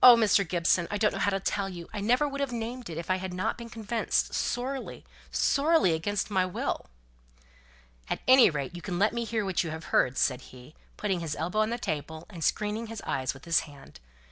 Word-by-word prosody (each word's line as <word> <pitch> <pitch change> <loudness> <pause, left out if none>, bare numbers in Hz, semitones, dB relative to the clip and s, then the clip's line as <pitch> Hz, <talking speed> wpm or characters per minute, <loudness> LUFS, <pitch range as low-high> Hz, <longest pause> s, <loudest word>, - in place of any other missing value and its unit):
Mr. 225 -6 +7
Gibson, 175 0 +2
I 205 - -1
don't 210 0 +2
know - - -4
how - - +2
to 195 -1 0
tell 195 0 -1
you. 175 -2 -8
I 205 - -3
never 250 +8 +3
would 280 0 -4
have 275 -2 -1
named 240 0 -5
it, 160 - -6
if 170 +2 -3
I 185 - +2
had 185 -1 -5
not 185 - -1
been 235 -1 -9
convinced, 225 0 -1
sorely, 260 +3 -3 0.2
sorely 290 - +3
against 205 +6 -1
my 190 -2 +3
will." 185 -1 -3 1.2
"At - - -2
any 260 -3 +8
rate, 150 +2 -4
you 175 - -7
can 180 -1 -3
let 205 +4 +3
me 235 0 -2
hear 220 -2 -1
what 190 -2 +1
you've 160 -1 -5
heard," 130 -3 +2
said 130 -1 +1
he, 125 +4 -14 0.2
putting 195 -4 -1
his 160 -3 -3
elbow 180 +6 -2
on 215 0 +3
the 235 - -1
table, 160 -5 -4
and 170 -4 -6
screening 210 +6 0
his 225 -1 -7
eyes 130 0 -1
with 135 - -13
his 165 -1 +4
hand. 140 - -12
195 Hz, 220 wpm, -28 LUFS, 165-230 Hz, 1.2 s, any